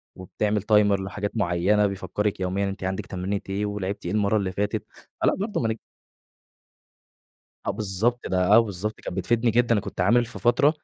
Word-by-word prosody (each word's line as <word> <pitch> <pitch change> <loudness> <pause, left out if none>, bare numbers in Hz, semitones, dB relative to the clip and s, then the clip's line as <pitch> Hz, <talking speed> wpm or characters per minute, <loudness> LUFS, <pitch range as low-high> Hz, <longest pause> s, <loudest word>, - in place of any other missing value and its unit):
وبتعمل 105 +3 -1
timer 105 -1 +4
لحاجات 100 +1 -4
معيّنة 100 +2 +2
بيفكرِك 100 +1 -2
يوميًا 95 +2 -1
أنتِ 95 0 -7
عندِك 95 0 -2
تمرينة 95 +2 -3
إيه 100 +2 -1
ولعبتِ 100 -1 -4
إيه 85 - -2
المَرّة 105 +1 +2
اللي 95 -2 -1
فاتت، 105 +2 -2 0.4
فلأ - - +3
برضه 205 +3 -2
ما 115 - +1
نك 110 0 -2 1.9
آه - - +2
بالضبط 110 +4 0
ده 90 -1 +1
آه، 115 - +9
بالضبط، 105 -1 -3
كان - - -6
بتفيدني 115 +5 +1
جدًا، 115 -1 +3
كنت - - -6
عامل 120 +6 +4
في 115 - -9
فترة 140 +5 +4
105 Hz, 170 wpm, -25 LUFS, 95-110 Hz, 1.9 s, آه